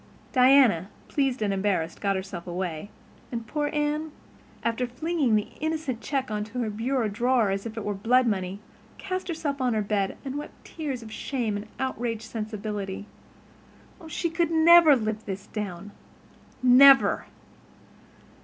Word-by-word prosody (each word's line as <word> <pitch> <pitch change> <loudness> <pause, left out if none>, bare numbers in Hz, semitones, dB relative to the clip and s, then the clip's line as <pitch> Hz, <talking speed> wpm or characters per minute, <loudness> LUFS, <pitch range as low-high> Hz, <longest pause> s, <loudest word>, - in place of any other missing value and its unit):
Diana, 250 - +5 0.2
pleased 265 -5 0
and 200 -2 0
embarrassed, 190 -4 -1
got 200 -1 +1
herself 190 -2 -6
away, 175 0 -4 0.4
and 230 -2 -4
poor 295 +5 -2
Anne, 300 +1 -1 0.5
after 235 +2 0
flinging 275 -1 0
the 210 - 0
innocent 310 -6 -2
check 265 -5 -2
into 210 +3 -4
her 230 -3 -1
bureau 235 +2 -1
drawer 235 0 +1
as 195 +3 -3
if 225 0 -9
it 220 - -4
were 205 - -1
blood 245 +6 +3
money, 195 -3 -2 0.4
cast 370 -1 -4
herself 310 -5 -3
on 250 -3 +1
her 215 - +1
bed 200 -1 -1
and 275 +2 -3
wept 295 - -11
tears 280 -7 -5
of 220 - -10
shame 235 -2 -2
and 205 +1 -5
outraged 240 -4 -2
sensibility. 210 -3 -5 0.9
Oh, 325 - -12
she 335 +1 -2
could 335 0 +1
never 330 -1 +7
live 220 -2 -2
this 195 0 -5
down—never! 225 +7 +2
230 Hz, 145 wpm, -26 LUFS, 205-275 Hz, 0.9 s, never